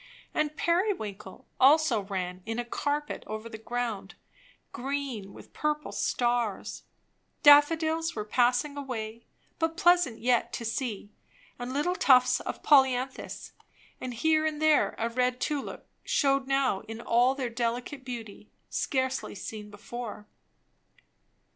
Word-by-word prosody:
And 305 Hz, 0 st, -1 dB
periwinkle 315 Hz, -, -1 dB
also 275 Hz, -4 st, +5 dB
ran 185 Hz, -2 st, -4 dB
in 225 Hz, 0 st, -2 dB
a 240 Hz, -, -2 dB
carpet 290 Hz, +4 st, -2 dB
over 215 Hz, +1 st, -5 dB
the 220 Hz, -1 st, -9 dB
ground, 225 Hz, -4 st, -4 dB, 0.6 s
green 260 Hz, -6 st, -4 dB
with -, -, -14 dB
purple 300 Hz, 0 st, -2 dB
stars; 240 Hz, -4 st, -1 dB, 0.6 s
daffodils 320 Hz, +3 st, +5 dB
were 210 Hz, -, -3 dB
passing 245 Hz, +5 st, +2 dB
away, 230 Hz, -5 st, -5 dB, 0.3 s
but 325 Hz, 0 st, 0 dB
pleasant 350 Hz, -9 st, +4 dB
yet 235 Hz, 0 st, +1 dB
to 235 Hz, -, -4 dB
see; 225 Hz, -3 st, -3 dB, 0.5 s
and 245 Hz, +1 st, -4 dB
little 295 Hz, +7 st, 0 dB
tufts 255 Hz, -8 st, +5 dB
of -, -, -6 dB
polyanthus 265 Hz, -2 st, +2 dB, 0.5 s
and 250 Hz, -2 st, -5 dB
here 310 Hz, +5 st, +2 dB
and 310 Hz, -1 st, -1 dB
there 310 Hz, -1 st, +3 dB
a 230 Hz, -, 0 dB
red 250 Hz, +1 st, 0 dB
tulip 290 Hz, -3 st, -3 dB, 0.2 s
shewed 275 Hz, -2 st, +1 dB
now 270 Hz, -7 st, +2 dB
in 225 Hz, +1 st, -7 dB
all 240 Hz, +3 st, +3 dB
their 260 Hz, -3 st, -2 dB
delicate 245 Hz, +3 st, -3 dB
beauty, 225 Hz, -5 st, -8 dB, 0.2 s
scarcely 260 Hz, -3 st, -1 dB
seen 210 Hz, +1 st, -7 dB
before. 210 Hz, +1 st, -7 dB
250 Hz, 125 wpm, -28 LUFS, 225-290 Hz, 0.6 s, also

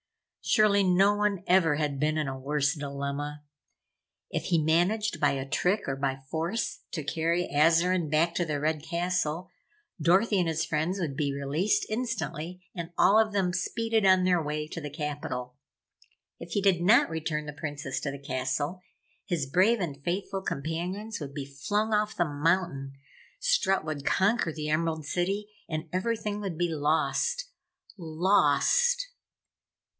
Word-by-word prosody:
Surely 205 Hz, -2 st, +4 dB
no 190 Hz, +2 st, +4 dB
one 205 Hz, -3 st, 0 dB
ever 175 Hz, -4 st, +4 dB
had 145 Hz, -2 st, -1 dB
been 155 Hz, +1 st, +1 dB
in 155 Hz, -2 st, 0 dB
a 135 Hz, 0 st, -4 dB
worse 140 Hz, +1 st, 0 dB
dilemma. 145 Hz, 0 st, -4 dB, 0.9 s
If -, -, -2 dB
he 170 Hz, -3 st, +2 dB
managed 175 Hz, +5 st, +1 dB
by 145 Hz, -2 st, +3 dB
a 135 Hz, 0 st, -3 dB
trick 180 Hz, +8 st, 0 dB
or 135 Hz, -, -1 dB
by 135 Hz, -1 st, -2 dB
force 170 Hz, +9 st, -2 dB
to 155 Hz, -, -3 dB
carry 165 Hz, +4 st, 0 dB
Azarine 165 Hz, +2 st, +3 dB
back 160 Hz, +3 st, +2 dB
to 175 Hz, -, +1 dB
the 150 Hz, -3 st, -2 dB
Red 155 Hz, +1 st, 0 dB
Castle, 175 Hz, +1 st, -2 dB, 0.5 s
Dorothy 190 Hz, +6 st, +3 dB
and 175 Hz, -, +1 dB
his 165 Hz, 0 st, 0 dB
friends 165 Hz, +6 st, -1 dB
would 155 Hz, -7 st, -2 dB
be 140 Hz, 0 st, 0 dB
released 140 Hz, +8 st, 0 dB
instantly 185 Hz, -7 st, -4 dB
and 170 Hz, -2 st, -6 dB
all 205 Hz, +4 st, +6 dB
of 220 Hz, -1 st, +2 dB
them 190 Hz, -3 st, 0 dB
speeded 225 Hz, +4 st, 0 dB
on 185 Hz, -1 st, +5 dB
their 180 Hz, -2 st, +3 dB
way 150 Hz, 0 st, -3 dB
to 165 Hz, -, -6 dB
the 150 Hz, -, -5 dB
Capitol. 145 Hz, -4 st, -5 dB, 0.8 s
If 170 Hz, -, -8 dB
he 205 Hz, -, +1 dB
did 190 Hz, -4 st, +3 dB
not 210 Hz, +7 st, +5 dB
return 155 Hz, -1 st, -2 dB
the 150 Hz, -, -6 dB
Princess 145 Hz, -2 st, -4 dB
to 140 Hz, -, -3 dB
the 140 Hz, -, -8 dB
castle, 140 Hz, +5 st, -2 dB, 0.4 s
his 165 Hz, -6 st, -1 dB
brave 190 Hz, -, +3 dB
and 145 Hz, -6 st, -4 dB
faithful 190 Hz, +3 st, -2 dB
companions 180 Hz, +8 st, -4 dB
would 140 Hz, -2 st, -7 dB
be 140 Hz, -2 st, -4 dB
flung 205 Hz, +11 st, -1 dB
off 210 Hz, 0 st, 0 dB
the 175 Hz, -, +3 dB
mountain, 145 Hz, -2 st, 0 dB, 0.5 s
Strut -, -, +2 dB
would 150 Hz, -3 st, -4 dB
conquer 190 Hz, +1 st, +2 dB
the 150 Hz, -1 st, -5 dB
Emerald 160 Hz, 0 st, 0 dB
City 195 Hz, +6 st, -1 dB, 0.2 s
and 155 Hz, 0 st, -3 dB
everything 210 Hz, +1 st, -1 dB
would 190 Hz, -5 st, -4 dB
be 175 Hz, 0 st, +1 dB
lost. 160 Hz, -, 0 dB, 0.5 s
LOST! 190 Hz, -, +3 dB
165 Hz, 160 wpm, -28 LUFS, 150-195 Hz, 0.9 s, all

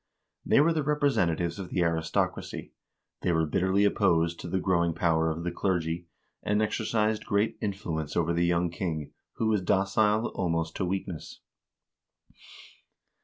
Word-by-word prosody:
They -, -, +4 dB
were 165 Hz, +2 st, +4 dB
the 155 Hz, -, 0 dB
representa 140 Hz, -, +2 dB
tives 85 Hz, +2 st, -2 dB
of 95 Hz, -2 st, -6 dB
the 90 Hz, -, +1 dB
aristocracy, 80 Hz, -1 st, -1 dB, 0.5 s
they 90 Hz, -, +1 dB
were 80 Hz, -1 st, +2 dB
bitterly 95 Hz, +6 st, +2 dB
opposed 85 Hz, -5 st, +2 dB
to -, -, -6 dB
the 95 Hz, +2 st, 0 dB
growing 85 Hz, -3 st, +1 dB
power 80 Hz, -1 st, +2 dB
of 80 Hz, +1 st, -3 dB
the 90 Hz, -, -2 dB
clergy, 85 Hz, -2 st, -1 dB, 0.3 s
and 105 Hz, 0 st, +1 dB
exercised 110 Hz, 0 st, 0 dB
great 105 Hz, +1 st, +1 dB
influence 85 Hz, -8 st, -3 dB
over 85 Hz, 0 st, +1 dB
the 85 Hz, +1 st, +1 dB
young 85 Hz, 0 st, +1 dB
king, 80 Hz, -4 st, -4 dB, 0.2 s
who 115 Hz, -, -2 dB
was 110 Hz, -3 st, +2 dB
docile 105 Hz, +4 st, +2 dB
almost 85 Hz, -3 st, -1 dB
to 95 Hz, -, 0 dB
weakness. 90 Hz, -3 st, -5 dB
90 Hz, 150 wpm, -28 LUFS, 85-105 Hz, 0.5 s, They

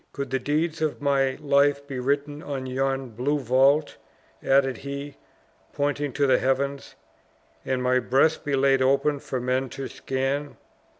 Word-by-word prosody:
Could 140 Hz, -2 st, -5 dB
the 135 Hz, -, +1 dB
deeds 155 Hz, +4 st, -1 dB
of 155 Hz, -2 st, -1 dB
my 135 Hz, -2 st, +1 dB
life 140 Hz, -1 st, +2 dB
be 135 Hz, -2 st, -5 dB
written 145 Hz, +3 st, -1 dB
on 140 Hz, -4 st, -5 dB
yon 135 Hz, 0 st, -1 dB
blue 125 Hz, +6 st, -1 dB
vault," 135 Hz, +3 st, +2 dB, 0.4 s
added 135 Hz, -2 st, +2 dB
he, 140 Hz, +1 st, -6 dB, 0.6 s
pointing 145 Hz, 0 st, -1 dB
to 145 Hz, -, +1 dB
the 130 Hz, -, +4 dB
heavens, 140 Hz, +1 st, -1 dB, 0.7 s
"and 130 Hz, -1 st, -1 dB
my 125 Hz, 0 st, +3 dB
breast 135 Hz, +6 st, +2 dB
be 145 Hz, -2 st, 0 dB
laid 135 Hz, 0 st, +3 dB
open 140 Hz, +2 st, +2 dB
for 130 Hz, -1 st, -4 dB
men 130 Hz, +1 st, -1 dB
to 135 Hz, +1 st, -6 dB
scan. 135 Hz, +2 st, -3 dB
140 Hz, 155 wpm, -25 LUFS, 130-145 Hz, 0.7 s, the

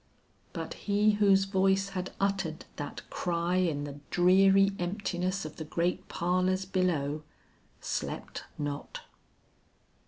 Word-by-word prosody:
But -, -, -5 dB, 0.2 s
he 205 Hz, +1 st, +4 dB
whose 200 Hz, -2 st, +4 dB
voice 195 Hz, 0 st, +2 dB
had 185 Hz, -1 st, -4 dB
uttered 195 Hz, -5 st, -1 dB
that 145 Hz, -, -6 dB
cry 175 Hz, 0 st, 0 dB
in 165 Hz, -6 st, +1 dB
the 145 Hz, 0 st, -7 dB
dreary 195 Hz, +2 st, +5 dB
emptiness 185 Hz, 0 st, -2 dB
of 155 Hz, -, -8 dB
the 160 Hz, -, -4 dB
great 170 Hz, +3 st, -1 dB
parlors 185 Hz, +2 st, +1 dB
below, 165 Hz, -6 st, 0 dB, 0.6 s
slept -, -, -4 dB
not. 145 Hz, -1 st, -4 dB
185 Hz, 115 wpm, -30 LUFS, 170-195 Hz, 0.6 s, dreary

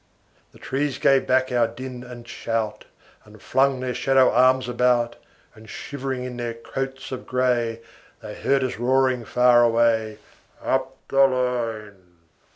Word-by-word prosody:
The -, -, -18 dB
trees 140 Hz, 0 st, -2 dB
gave 135 Hz, -1 st, +3 dB
back 130 Hz, 0 st, +2 dB
our 120 Hz, -2 st, +2 dB
din 125 Hz, +2 st, -8 dB
and 120 Hz, -1 st, -11 dB
shout, 115 Hz, -2 st, -3 dB, 0.4 s
And -, -, -17 dB
flung 135 Hz, 0 st, +1 dB
their 130 Hz, -1 st, -2 dB
shadow 135 Hz, 0 st, +3 dB
arms 130 Hz, +1 st, +3 dB
about; 125 Hz, -1 st, +1 dB, 0.4 s
And 110 Hz, 0 st, -16 dB
shivering 135 Hz, -2 st, -5 dB
in 125 Hz, -1 st, -6 dB
their 120 Hz, -1 st, -4 dB
coats 135 Hz, +3 st, -6 dB
of 130 Hz, -, -6 dB
gray, 120 Hz, -3 st, 0 dB, 0.4 s
They 105 Hz, -1 st, -7 dB
heard 135 Hz, +4 st, 0 dB
us 130 Hz, -3 st, -3 dB
roaring 130 Hz, -1 st, +1 dB
far 125 Hz, 0 st, +4 dB
away, 115 Hz, -2 st, +2 dB, 0.4 s
Up 130 Hz, 0 st, -2 dB
the 135 Hz, 0 st, +5 dB
line. 110 Hz, -8 st, -3 dB
125 Hz, 145 wpm, -23 LUFS, 115-130 Hz, 0.4 s, the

